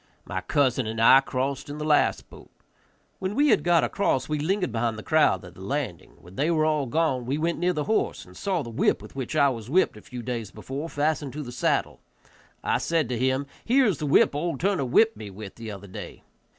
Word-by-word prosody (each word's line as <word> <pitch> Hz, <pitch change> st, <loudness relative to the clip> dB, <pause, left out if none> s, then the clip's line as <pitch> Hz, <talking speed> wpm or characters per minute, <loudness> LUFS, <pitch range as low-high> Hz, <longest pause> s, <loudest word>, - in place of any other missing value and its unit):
My -, -, -3 dB
cousin 130 Hz, -4 st, +1 dB
and 110 Hz, +1 st, -4 dB
I 125 Hz, +4 st, +8 dB
crossed 135 Hz, +1 st, -3 dB
in 145 Hz, -, -6 dB
the 150 Hz, -, -4 dB
last 150 Hz, -1 st, +2 dB
boat. -, -, -15 dB, 0.7 s
When 190 Hz, +2 st, -3 dB
we 290 Hz, +3 st, +4 dB
had 215 Hz, -, +4 dB
got 170 Hz, -2 st, +4 dB
across 135 Hz, -10 st, 0 dB
we 150 Hz, -1 st, -1 dB
lingered 180 Hz, -, 0 dB
behind 115 Hz, 0 st, -1 dB
the 110 Hz, -, -8 dB
crowd 150 Hz, -, +2 dB
at 90 Hz, -, -12 dB
the -, -, -14 dB
landing; 125 Hz, -, -4 dB
when 90 Hz, +2 st, -15 dB
they 150 Hz, +4 st, +1 dB
all 155 Hz, -3 st, +2 dB
were -, -, -8 dB
gone 135 Hz, -5 st, 0 dB
we 135 Hz, +3 st, 0 dB
went 165 Hz, +1 st, -1 dB
near 180 Hz, +1 st, +2 dB
the 155 Hz, -4 st, -2 dB
horse 220 Hz, +8 st, -1 dB
and -, -, -16 dB
saw 185 Hz, -6 st, -1 dB
the 115 Hz, -, -8 dB
whip 115 Hz, -, +2 dB
with -, -, -13 dB
which 135 Hz, +2 st, -4 dB
I 140 Hz, -2 st, +5 dB
was 115 Hz, -3 st, -6 dB
whipped 175 Hz, -7 st, +2 dB
a -, -, -12 dB
few 125 Hz, +2 st, -8 dB
days 115 Hz, -4 st, -4 dB
before 135 Hz, +10 st, -6 dB
fastened 145 Hz, -2 st, -1 dB
to 150 Hz, +1 st, -5 dB
the 120 Hz, -, -8 dB
saddle. 120 Hz, -, -1 dB, 0.6 s
I -, -, +1 dB
said 165 Hz, -6 st, 0 dB
to 120 Hz, -2 st, -2 dB
him, 130 Hz, +2 st, +1 dB, 0.2 s
"Here 260 Hz, +3 st, +4 dB
is 195 Hz, -, +1 dB
the 150 Hz, -, -2 dB
whip 140 Hz, -, +4 dB
old 155 Hz, -1 st, -2 dB
Turner 185 Hz, -7 st, +1 dB
whipped 220 Hz, -, +3 dB
me 105 Hz, -, -7 dB
with 100 Hz, 0 st, -9 dB
the 115 Hz, -1 st, -8 dB
other 100 Hz, -1 st, -8 dB
day." 95 Hz, -, -9 dB
140 Hz, 235 wpm, -26 LUFS, 120-160 Hz, 0.7 s, I